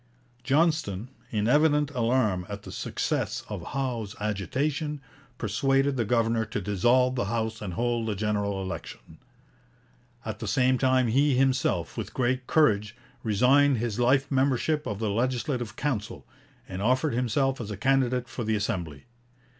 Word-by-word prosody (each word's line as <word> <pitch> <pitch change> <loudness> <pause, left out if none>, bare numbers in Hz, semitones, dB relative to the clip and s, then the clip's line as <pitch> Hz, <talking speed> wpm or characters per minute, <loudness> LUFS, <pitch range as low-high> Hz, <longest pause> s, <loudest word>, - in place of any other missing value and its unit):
Johnston, 135 - +1 0.2
in 105 -1 0
evident 150 +2 +3
alarm 115 -8 +1
at 100 0 -6
the - - -9
success - - -2
of - - -5
Howe's 120 -6 -3
agitation, 135 - -2 0.4
persuaded 135 +6 +1
the 120 -3 0
governor 115 0 +1
to 105 -1 -4
dissolve 120 +7 +2
the 125 -4 -1
House 110 +1 -2
and 95 -5 -5
hold 120 0 0
a 105 - -1
general 100 -1 -1
election. 85 -3 -8 1.1
At 110 -1 -5
the 110 - -5
same 130 +3 +2
time 130 -1 +3
he 135 +4 +3
himself, 130 0 +1
with - - -5
great 130 0 0
courage, 105 -8 +2 0.3
resigned 130 +5 +4
his 115 -1 -2
life 135 +3 +2
membership 140 +3 +1
of 105 - -3
the 110 -1 -1
Legislative 120 +1 -1
Council, 125 -8 -3 0.4
and 95 0 -6
offered 130 +6 +2
himself 125 +2 0
as 110 - -6
a 105 - -5
candidate 125 +1 +1
for 120 - -5
the 110 0 0
Assembly. 90 -8 -3
120 Hz, 145 wpm, -27 LUFS, 105-135 Hz, 1.1 s, resigned